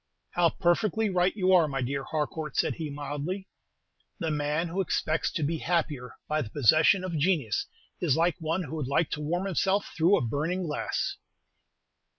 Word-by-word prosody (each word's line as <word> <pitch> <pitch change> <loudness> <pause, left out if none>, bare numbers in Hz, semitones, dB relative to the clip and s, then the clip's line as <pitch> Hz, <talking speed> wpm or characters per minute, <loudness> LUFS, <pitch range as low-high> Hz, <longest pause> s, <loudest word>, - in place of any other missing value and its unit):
"How 175 -1 +3
perfectly 215 +6 +1
right 180 +1 +2
you 190 -2 +3
are, 170 -4 +6
my 135 -3 -2
dear 135 +2 -2
Harcourt," 155 0 -3
said - - +2
he, 160 -3 -5
mildly. 145 +7 -4 0.7
"The 165 -2 -2
man 150 +3 0
who 185 +4 -1
expects 160 -3 0
to 160 - -1
be 160 +2 -1
happier 150 -7 -1
by 155 0 0
the 115 - -5
possession 155 - +4
of 170 -4 -2
genius 150 - +1 0.3
is 155 -6 +2
like 170 0 +2
one 165 +3 -1
who 160 0 -6
would 145 -5 -2
like 140 +4 +1
to 150 - -3
warm 175 +5 -1
himself 195 +2 0
through 170 +5 +4
a - - 0
burning 160 +10 -1
glass." 150 -3 -2
160 Hz, 175 wpm, -28 LUFS, 150-180 Hz, 0.7 s, are